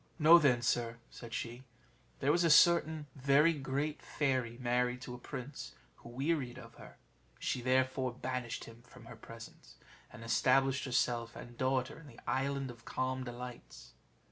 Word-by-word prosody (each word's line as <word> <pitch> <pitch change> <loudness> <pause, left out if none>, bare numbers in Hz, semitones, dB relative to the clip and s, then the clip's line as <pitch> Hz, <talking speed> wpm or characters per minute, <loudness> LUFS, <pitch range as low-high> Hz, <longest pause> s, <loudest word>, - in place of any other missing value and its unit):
"Know 165 +2 +8
then, 125 -6 +3
sir," 115 -1 0
said 120 -2 -10
she, 120 +2 -5 0.6
"there 140 - +3
was 175 +3 +3
a 165 - +4
certain 160 -1 +5
very 140 +4 +4
great 145 +1 -3
fairy 130 -5 -1
married 125 0 0
to 125 - -7
a 125 - -8
prince 125 - -7 0.2
who - - -13
wearied 130 -1 -1
of 130 - -11
her; - - -14 0.4
she 125 - -2
therefore 130 0 +1
banished 125 -2 -4
him 115 0 -13
from 120 -1 -16
her 120 - -10
presence, 115 0 -12 0.4
and 115 - -11
established 135 +4 +2
herself 120 -2 0
and 120 0 -10
daughter 130 +2 -1
in 155 - -14
the 120 - -14
Island 135 0 -1
of 120 -1 -15
Calm 130 +2 -2
Delights. 120 - -9
130 Hz, 160 wpm, -33 LUFS, 120-140 Hz, 0.6 s, Know